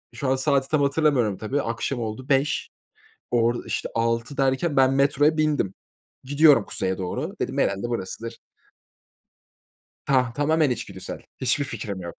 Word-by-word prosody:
şu 140 Hz, -, -3 dB
an 130 Hz, -, +3 dB
saati 135 Hz, 0 st, +1 dB
tam 155 Hz, -2 st, +2 dB
hatırlamıyorum, 140 Hz, -8 st, +2 dB
tabii 130 Hz, +8 st, -2 dB
akşam 115 Hz, +2 st, -3 dB
oldu 115 Hz, +4 st, -5 dB
5. 135 Hz, +1 st, +1 dB, 0.6 s
Orada, 120 Hz, 0 st, +1 dB
işte, -, -, -2 dB
6 115 Hz, +3 st, -1 dB
derken 135 Hz, +3 st, +1 dB
ben 135 Hz, 0 st, +5 dB
metroya 145 Hz, +3 st, +3 dB
bindim. 150 Hz, -11 st, +1 dB, 0.5 s
"Gidiyorum 145 Hz, -3 st, +5 dB
Kuzey'e 95 Hz, 0 st, -2 dB
doğru," 90 Hz, -1 st, -4 dB
dedim, -, -, -2 dB
"herhâlde 100 Hz, +4 st, 0 dB
burasıdır." 115 Hz, +1 st, -5 dB, 1.7 s
Tah 130 Hz, -3 st, +2 dB
tamamen 155 Hz, +1 st, +2 dB
içgüdüsel 125 Hz, -, -5 dB, 0.2 s
hiçbir 130 Hz, +3 st, +1 dB
fikrim 105 Hz, -6 st, -5 dB
yok. 85 Hz, -1 st, -7 dB
130 Hz, 140 wpm, -24 LUFS, 115-145 Hz, 1.7 s, ben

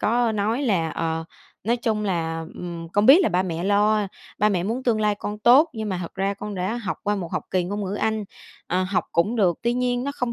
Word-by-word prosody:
có 235 Hz, 0 st, +2 dB
nói 215 Hz, +6 st, 0 dB
là 180 Hz, -10 st, +1 dB
"Ờ, 165 Hz, 0 st, -2 dB, 0.4 s
nói 235 Hz, +2 st, +2 dB
chung 220 Hz, -3 st, -1 dB
là, 165 Hz, -4 st, -2 dB
ừm, 170 Hz, -2 st, -6 dB
con 205 Hz, +1 st, +3 dB
biết 285 Hz, +8 st, +9 dB
là -, -, +3 dB
ba 180 Hz, -2 st, +1 dB
mẹ 175 Hz, -1 st, -3 dB
lo, 210 Hz, +1 st, +3 dB, 0.3 s
ba 210 Hz, -, +4 dB
mẹ 185 Hz, -4 st, 0 dB
muốn 230 Hz, +7 st, -2 dB
tương 230 Hz, -4 st, +1 dB
lai 210 Hz, -1 st, +2 dB
con 210 Hz, 0 st, -5 dB
tốt, 270 Hz, +9 st, +6 dB
nhưng 220 Hz, -2 st, -4 dB
mà 185 Hz, -, -2 dB
thật 170 Hz, -, -8 dB
ra 195 Hz, +1 st, -1 dB
con 205 Hz, +1 st, -6 dB
đã 185 Hz, +4 st, -2 dB
học 230 Hz, -5 st, -4 dB
qua 205 Hz, 0 st, 0 dB
một 175 Hz, -4 st, -5 dB
học -, -, -1 dB
kỳ 185 Hz, -1 st, +1 dB
ngôn 200 Hz, +3 st, -3 dB
ngữ 195 Hz, +1 st, -3 dB
anh, 220 Hz, 0 st, -1 dB, 0.4 s
ờ, 180 Hz, +2 st, 0 dB
học 185 Hz, +1 st, 0 dB
cũng 205 Hz, +8 st, +1 dB
được, 180 Hz, -6 st, +2 dB
tuy 235 Hz, -, +1 dB
nhiên 245 Hz, 0 st, 0 dB
nó 280 Hz, -, -2 dB
không 250 Hz, -4 st, -2 dB
205 Hz, 250 wpm, -24 LUFS, 185-230 Hz, 0.4 s, biết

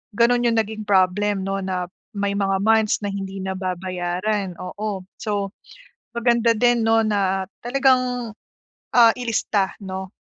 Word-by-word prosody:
gano'n 240 Hz, +1 st, +3 dB
yung 230 Hz, -1 st, +2 dB
naging 215 Hz, 0 st, -7 dB
problem 195 Hz, +1 st, +2 dB
'no, 195 Hz, 0 st, -1 dB
na 180 Hz, -1 st, -2 dB, 0.3 s
may 200 Hz, 0 st, -1 dB
mga 195 Hz, -1 st, +1 dB
months 220 Hz, -1 st, +3 dB
na 205 Hz, -, -1 dB
hindi 195 Hz, 0 st, -5 dB
nababayaran, 185 Hz, +1 st, -2 dB
oo. 200 Hz, +1 st, -4 dB, 0.2 s
So, 205 Hz, -2 st, -2 dB, 0.7 s
maganda 235 Hz, -1 st, +3 dB
din 240 Hz, 0 st, +3 dB
'no, 225 Hz, 0 st, +4 dB
na 195 Hz, -2 st, 0 dB, 0.2 s
talagang, 250 Hz, -3 st, +1 dB, 0.6 s
ah, 235 Hz, -2 st, +8 dB
ilista 220 Hz, -5 st, 0 dB
'no, 190 Hz, 0 st, -6 dB
205 Hz, 130 wpm, -22 LUFS, 190-230 Hz, 0.7 s, ah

